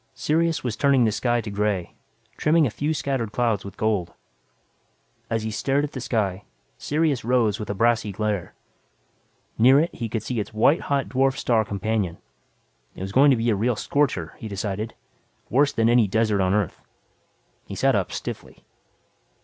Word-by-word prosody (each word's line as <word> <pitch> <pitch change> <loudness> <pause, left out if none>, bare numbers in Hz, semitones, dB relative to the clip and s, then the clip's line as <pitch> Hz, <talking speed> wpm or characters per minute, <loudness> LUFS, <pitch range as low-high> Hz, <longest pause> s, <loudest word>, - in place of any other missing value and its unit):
Sirius 165 +1 0
was 120 -4 -2
turning 140 0 +3
the 110 - +2
sky 120 +3 0
to 105 -2 -7
gray, 100 -3 -1 0.4
trimming 160 0 +3
a 120 - -1
few 145 +7 -2
scattered 135 -7 -2
clouds 115 -4 0
with 100 - -10
gold. 105 -5 -1 1.1
As 115 -1 -1
he 110 - -3
stared 135 +7 0
at 150 - -3
the 130 - -6
sky, 100 -6 -1 0.4
Sirius 150 -3 0
rose 115 -3 +1
with 105 - -6
a 100 - -2
brassy 115 0 +2
glare. 105 -2 -3 1.0
Near 130 +5 +7
it 165 +3 0
he 115 -2 -5
could 110 -1 -3
see 125 -1 -3
its 105 +1 -5
white 140 +9 +4
hot 140 -2 -1
dwarf 135 +1 +1
star 115 -3 +2
companion. 100 -3 -2 0.8
It - - -9
was 95 +1 -4
going 140 +6 +5
to 130 - +4
be 115 +1 +1
a - - +2
real 115 +4 0
scorcher, 110 - -1
he 110 - -6
decided; 105 +2 -4 0.6
worse 140 +2 +3
than 115 0 +1
any 120 -2 +4
desert 110 0 +1
on 95 +1 +2
Earth. 105 -5 -1 0.9
He - - -6
sat - - +2
up - - 0
stiffly. - - -7
115 Hz, 175 wpm, -24 LUFS, 105-135 Hz, 1.1 s, Near